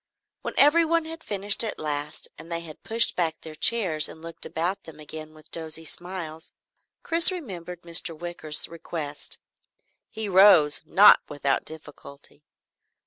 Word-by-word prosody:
When - - -6
everyone 330 +2 +4
had 325 0 -9
finished 205 +2 +3
at 220 - -3
last 150 0 -4
and 165 - -13
they 170 0 -3
had 160 -2 -11
pushed 230 +1 +3
back 165 -3 -1
their 160 - -10
chairs 165 -4 +3
and - - -12
looked 165 +1 -7
about 175 +4 -3
them 160 -1 -13
again 155 +1 -10
with 155 0 -18
dozy 160 -1 -5
smiles, 170 -2 -7 0.5
Chris 335 +2 +5
remembered 180 - -8
Mr. 170 -1 +1
Wicker's 165 -3 -3
request. 160 -3 -6 0.7
He 220 -1 -6
rose, 185 -6 +5
not 205 +2 +7
without 140 -2 -2
difficulty. 145 -2 -11
170 Hz, 140 wpm, -24 LUFS, 155-200 Hz, 0.7 s, not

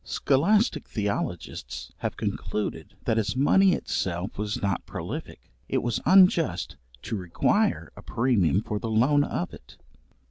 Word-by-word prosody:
Scholastic 205 - +2
theologists 100 -5 -4
have - - -4
concluded, 80 -7 -4
that 110 - +2
as 110 +2 -1
money 185 +8 +4
itself 90 - -2
was 105 0 -3
not 100 -3 -1
prolific, - - -7 0.2
it - - 0
was 120 -2 -1
unjust 185 -4 +4 0.3
to 115 - -3
require 90 -4 0
a - - -11
premium 110 -6 +1
for 105 -1 -3
the 115 - -4
loan 130 +7 +3
of 90 -9 -3
it. - - -14
110 Hz, 135 wpm, -26 LUFS, 100-145 Hz, 0.3 s, money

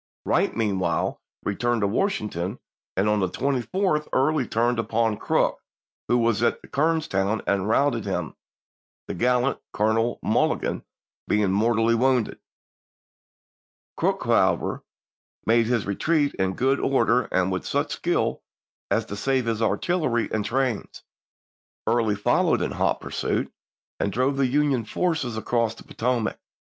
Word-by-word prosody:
Wright - - +1
meanwhile 95 -6 0 0.2
returned 120 +3 0
to 100 - +2
Washington; 105 - -1 0.4
and 95 +2 +2
on 105 0 +2
the 95 -2 +1
24th 150 - 0
Early 135 -1 +2
turned 120 +1 +1
upon 115 -1 +1
Crook, - - +1 0.5
who 120 - +3
was 115 -2 +2
at 120 - +2
Kernstown, 140 -10 0
and 100 0 0
routed 140 +5 +2
him, - - -3 0.7
the - - -3
gallant 125 +2 +1
Colonel 110 +3 +1
Mulligan - - 0 0.4
being 105 -2 +2
mortally 115 +3 +2
wounded. 125 0 +1 1.6
Crook, - - 0
however, - - +2 0.6
made 115 0 +3
his 120 -3 +1
retreat 145 - +1
in 95 0 -1
good 135 +2 +2
order 125 -3 +2
and 95 0 +1
with 95 - -2
such - - -1
skill - - 0 0.5
as - - +1
to 100 - -6
save 130 +4 0
his 115 -1 -1
artillery 125 0 +1
and 110 -1 0
trains. 125 +1 -2 0.8
Early 115 -2 +2
followed 100 - +2
in - - -2
hot - - 0
pursuit, - - -2 0.5
and 100 - 0
drove 130 +5 +1
the 135 -1 +3
Union 140 -2 +1
forces 150 -3 -1
across 115 0 0
the - - -13
Potomac. 120 -1 -1
115 Hz, 135 wpm, -25 LUFS, 105-135 Hz, 1.6 s, who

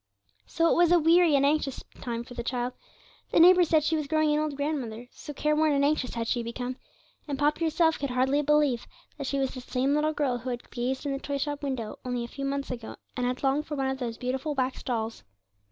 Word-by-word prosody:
So 330 - +2
it - - +3
was 345 -1 +4
a 350 - +7
weary 335 -1 +5
and 280 0 +4
anxious 285 -2 0 0.2
time 235 -1 -3
for 245 - -12
the 240 - -4
child. 245 +1 -2 0.6
The - - +3
neighbours 355 0 +7
said 315 -2 +4
she 310 +1 +1
was 305 -2 -2
growing 310 0 +2
an 300 - +2
old 305 -2 -1
grandmother, 260 -6 -3
so - - -9
careworn 300 +1 +2
and 280 0 +3
anxious 285 -4 0
had 230 -1 -2
she 240 - 0
become, 245 +2 -4 0.5
and 285 -2 -2
Poppy 300 +3 +1
herself 320 0 +2
could 280 - -2
hardly 260 +3 +2
believe 295 -4 +2 0.3
that 280 - -3
she 275 - -1
was 270 -1 0
the 255 - -7
same 255 +2 0
little 300 +1 +2
girl 270 -5 0
who 250 +2 -5
had 245 -1 -6
gazed 255 +3 -2
in 285 - -1
the 275 - -2
toy 285 0 -3
shop 290 +1 -3
window 260 -6 -4
only 245 -1 -2
a - - -5
few 275 +3 -6
months 275 0 -2
ago 235 -3 -6 0.2
and 250 -1 0
had 250 +2 -3
longed 275 +3 +1
for 300 - -3
one 270 -1 0
of 265 - -4
those 235 -3 -4
beautiful 265 +4 -2
wax 260 -1 -1
dolls. 225 -2 -3
275 Hz, 240 wpm, -28 LUFS, 250-300 Hz, 0.6 s, a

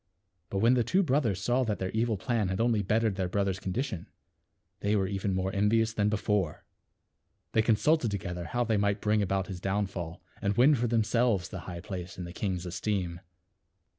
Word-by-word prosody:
But 100 - -3
when 115 +3 +5
the 125 -2 +3
two 190 - +2
brothers 125 - +1
saw 125 +3 +2
that 105 -2 -1
their 95 0 -3
evil 110 -1 0
plan 115 -1 0
had 95 +1 -2
only 115 -2 +2
bettered 105 0 +1
their 95 -2 -1
brother's 100 -1 0
condition, 100 0 -3 0.7
they 100 +1 +1
were 95 -2 +2
even 95 0 -1
more 95 +1 0
envi 105 +3 +3
ous 110 0 -3
than 105 -1 +2
before. 105 -6 -1 0.9
They 110 - +3
consulted 120 +5 +3
to 100 - -1
gether 90 -1 -5
how 120 +8 0
they 110 -2 +1
might 100 0 +1
bring 105 0 +2
about 95 -1 0
his 90 -2 -7
downfall, 95 -4 -3 0.2
and 100 0 0
win 135 +5 +6
for 120 -3 +1
themselves 115 -3 +2
the 95 - -6
high 85 -1 -6
place 90 -1 -6
in 90 - -5
the 85 0 -7
king's 95 -2 -2
esteem. 90 -1 -2
100 Hz, 195 wpm, -29 LUFS, 95-115 Hz, 0.9 s, win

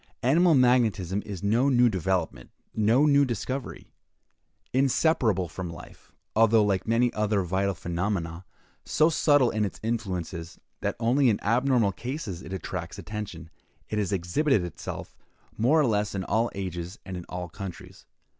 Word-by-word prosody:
Animal 165 +6 +4
magnetism 110 -7 +2
is 100 -3 -6
no 115 +7 +3
new 125 -2 +5
development, 90 - -1 0.2
no 115 +7 +3
new 140 -1 +5
discovery. 130 +2 -4 0.8
Inseparable 130 - +2
from 90 +2 -6
life, 85 +1 -12 0.2
although, 115 0 +5
like 100 -1 0
many 115 +2 +2
other 105 -2 +1
vital 95 +2 0
phenomena, 85 0 -3 0.4
so 155 +2 +3
subtle 145 -5 +4
in 110 -1 0
its 100 - -4
influences, 90 -7 -4 0.2
that - - -2
only 125 +3 +3
in 105 - +1
abnormal 120 -1 +2
cases 115 - -5
it 85 - -10
attracts 90 -1 -5
attention, 100 -3 -7 0.4
it 105 - -1
has 100 -2 -1
exhibited 100 - +1
itself 90 - -7 0.4
more 130 +9 +3
or 150 - +4
less 105 -3 0
in 95 - -2
all 115 +4 +1
ages 90 -1 -5
and 95 0 -6
in 90 - -6
all 90 -1 -5
countries. 90 0 -9
105 Hz, 145 wpm, -27 LUFS, 90-125 Hz, 0.8 s, new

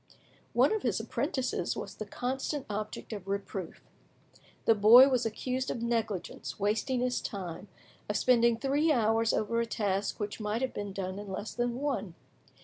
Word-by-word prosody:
One - - +4
of 435 - -1
his 225 -5 0
apprentices 255 +4 -2
was - - -5
the 215 - -7
constant 265 +5 -3
object 215 +2 -5
of 200 -3 -7
reproof. 195 -3 -4 0.8
The 225 - +6
boy 225 +6 +8
was 250 -3 +1
accused 255 +4 -3
of 235 - -3
negligence, 225 -7 -2
wasting 225 +5 0
his 250 0 0
time, 190 -2 -6 0.4
of 210 - +1
spending 235 -2 +4
three 285 +5 +2
hours 225 -3 +3
over 230 +2 0
a 235 - 0
task 200 -3 -1
which 205 +1 -4
might 215 +3 -1
have 260 - -1
been 205 -1 -4
done 190 0 -4
in 205 -1 -7
less 205 +3 -5
than 240 0 -1
one. 270 -11 -2
225 Hz, 165 wpm, -30 LUFS, 205-250 Hz, 0.8 s, boy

